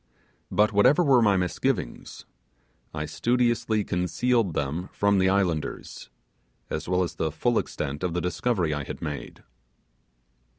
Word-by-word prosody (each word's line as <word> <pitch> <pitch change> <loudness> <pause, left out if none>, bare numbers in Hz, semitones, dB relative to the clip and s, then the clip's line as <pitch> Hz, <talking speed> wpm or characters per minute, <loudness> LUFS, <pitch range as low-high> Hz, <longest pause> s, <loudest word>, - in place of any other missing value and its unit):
But 105 +1 +2
whatever 130 - +5
were 135 -5 +5
my 100 -3 +4
misgivings, 90 -8 -2 0.7
I 75 0 -4
studiously 120 +4 +1
concealed 95 +2 0
them 75 +6 -2
from 100 -1 +2
the 95 0 +3
islanders, 90 -6 -2 0.6
as 75 +2 -4
well 90 0 +2
as 85 -2 -4
the 80 0 -2
full 120 +9 +1
extent 70 +2 -4
of 90 -2 -2
the - - +1
discovery 90 -2 0
I 75 -1 -3
had - - -7
made. 75 -5 -6
90 Hz, 135 wpm, -26 LUFS, 80-110 Hz, 0.7 s, whatever